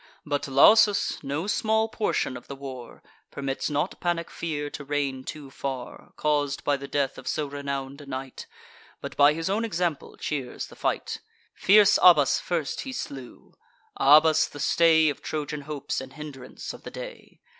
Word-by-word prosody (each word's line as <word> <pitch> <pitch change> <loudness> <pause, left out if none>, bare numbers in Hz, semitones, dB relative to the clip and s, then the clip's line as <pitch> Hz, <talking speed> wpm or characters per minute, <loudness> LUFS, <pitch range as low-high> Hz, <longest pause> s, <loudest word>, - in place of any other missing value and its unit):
But 145 -1 -2
Lausus, 205 +11 +5
no 145 +5 -2
small 220 +1 +1
portion 215 - -1
of - - -10
the 140 - -7
war, 130 -3 -9 0.3
Permits 135 +1 -3
not 145 0 -2
panic 170 -1 -2
fear 150 -3 -3
to 145 - -7
reign 140 -2 -2
too 140 -1 -8
far, 130 -2 -6
Caus'd 145 -2 0
by 145 - +2
the 140 0 -7
death 140 0 -1
of - - -12
so 150 - -1
renown'd 140 0 -5
a 145 - -13
knight; 130 0 -6 0.5
But - - -7
by 145 +1 +6
his 165 +2 -3
own 205 +4 0
example 175 -8 -2
cheers 135 -5 -4
the - - -14
fight. - - -2 0.3
Fierce 205 +1 +5
Abas 150 -7 +6
first 165 -5 -2
he 265 - -6
slew; 135 - -8 0.4
Abas, 155 +3 +6
the 145 - -11
stay 160 +1 +4
Of 145 - -2
Trojan 150 -1 -4
hopes, 145 -2 -4
and 130 0 -10
hindrance 145 -4 -8
of - - -12
the - - -8
day. - - -10
145 Hz, 165 wpm, -26 LUFS, 140-165 Hz, 0.5 s, by